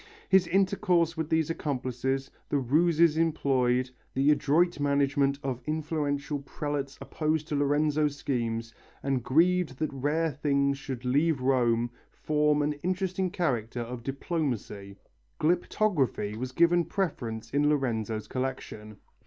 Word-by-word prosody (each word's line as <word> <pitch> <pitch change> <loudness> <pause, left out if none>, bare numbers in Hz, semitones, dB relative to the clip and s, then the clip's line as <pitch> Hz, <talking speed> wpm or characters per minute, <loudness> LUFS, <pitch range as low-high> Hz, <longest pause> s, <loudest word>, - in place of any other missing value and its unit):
His 190 -2 +5
intercourse 180 -2 +2
with 160 -2 -3
these 160 0 +1
accomplices, 135 -2 -2 0.2
the 145 - +1
ruses 160 +4 +3
employed, 130 -6 +1 0.2
the 135 +3 +4
adroit 150 +4 +2
management 140 -1 +2
of 130 -2 -3
influential 150 -2 -2
prelates 140 0 -4
opposed 155 0 -2
to 150 - -1
Lorenzo's 145 +1 +1
schemes, 115 -4 -2 0.3
and 135 -2 0
grieved 165 +1 +2
that 155 -1 -2
rare 150 +4 0
things 140 0 0
should 130 -3 -6
leave 145 +4 +2
Rome, 120 -3 +2 0.2
form 150 -1 +1
an 150 +1 0
interesting 185 +1 -1
chapter 120 -9 -1
of 120 +1 -6
diplomacy. 125 - -3 0.4
Glyptography 155 - +1
was 125 +3 -4
given 170 +5 +4
preference 120 - -3
in 145 +1 +2
Lorenzo's 115 -7 -1
collection. 125 -5 -5
145 Hz, 120 wpm, -28 LUFS, 130-160 Hz, 0.4 s, His